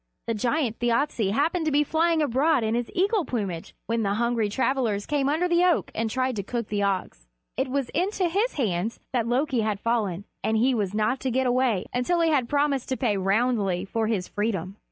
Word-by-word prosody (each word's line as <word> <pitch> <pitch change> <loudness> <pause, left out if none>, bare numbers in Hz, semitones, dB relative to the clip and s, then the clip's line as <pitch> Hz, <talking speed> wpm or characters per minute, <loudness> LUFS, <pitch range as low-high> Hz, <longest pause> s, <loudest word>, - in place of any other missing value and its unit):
The 230 - -1
giant 235 +2 -1
Thjasse 240 -3 +1
happened 320 - +1
to - - +2
be 290 +1 +4
flying 320 +1 +2
abroad 280 +1 +2
in 220 0 0
his 240 0 -1
eagle 395 +2 +2
plumage 195 - -4
when 230 0 0
the 200 -1 0
hungry 235 -1 +1
travelers 235 -3 0
came 285 -2 0
under 320 +5 +1
the 345 0 +3
oak 360 -2 +2
and 225 0 -1
tried 255 +1 -1
to - - 0
cook 235 +2 -4
the 205 -1 -1
ox. 185 - -2 0.3
It 265 +1 0
was 270 -1 -1
into 370 +1 0
his 405 +8 0
hands 215 - -1
that 235 -3 +1
Loki 255 0 +1
had 210 -2 -1
fallen, 205 -5 -1 0.2
and 220 - +1
he 255 +4 +3
was 205 -4 -1
not 215 +5 +1
to 265 - -2
get 260 +2 +1
away 245 -6 +1
until 250 +8 +1
he 330 -1 +3
had 260 -5 +1
promised 285 -3 +1
to 260 - -1
pay 230 -6 +1
roundly 195 -1 +1
for 220 +2 -1
his 200 -5 -1
freedom. 200 -3 -2
240 Hz, 210 wpm, -25 LUFS, 210-285 Hz, 0.3 s, be